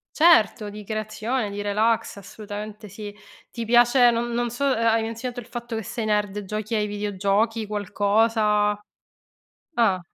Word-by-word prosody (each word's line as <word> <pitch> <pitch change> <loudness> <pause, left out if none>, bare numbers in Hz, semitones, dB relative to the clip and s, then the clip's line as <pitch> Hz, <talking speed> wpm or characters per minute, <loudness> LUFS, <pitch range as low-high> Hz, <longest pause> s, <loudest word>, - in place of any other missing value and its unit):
Certo, 265 -10 +4
di 210 +1 -9
creazione, 215 +2 -3
di 205 0 -4
relax, 215 +2 0
assolutamente 210 +1 -8
sì. 205 +1 -8 0.4
Ti 235 -1 -5
piace, 240 +2 +5
non 235 0 -1
non 240 0 -1
so, 240 +4 -4
hai 230 -4 +2
menzionato 230 +2 -5
il 240 - -9
fatto 240 -1 -6
che 220 - -3
sei 225 +3 -4
nerd, 210 -1 0
giochi 215 +3 -4
ai 210 -1 +1
videogiochi, 205 +2 -1
qualcosa? 210 +1 +1 0.9
Ah. 225 -8 +2
215 Hz, 140 wpm, -24 LUFS, 205-230 Hz, 0.9 s, piace